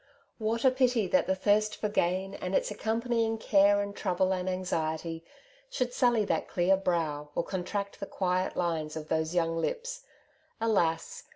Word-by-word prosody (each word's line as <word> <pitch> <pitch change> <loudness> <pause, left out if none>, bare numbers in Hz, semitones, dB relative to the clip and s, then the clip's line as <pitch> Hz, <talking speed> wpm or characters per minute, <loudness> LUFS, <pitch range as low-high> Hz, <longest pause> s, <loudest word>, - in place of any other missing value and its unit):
What 230 +3 -1
a 260 - +7
pity 250 -4 +2
that 280 - +3
the 190 - +2
thirst 210 +2 +2
for 210 - -2
gain, 190 -1 0
and 185 -1 -3
its - - +1
accompanying 225 0 0
care 205 -1 +4
and 200 0 -5
trouble 185 0 +1
and 185 0 -2
anxiety, 165 -3 -2 0.5
should 250 - -2
sully 240 -4 +3
that - - -1
clear 180 +1 +3
brow, 160 -6 -1
or - - +1
con 185 0 -3
tract 200 +1 -4
the 200 - -5
quiet 185 0 -1
lines 160 -3 -1
of 155 -1 -6
those 160 +1 0
young 165 -1 +1
lips! - - -3 0.6
Alas 195 -8 0
195 Hz, 170 wpm, -29 LUFS, 175-225 Hz, 0.6 s, a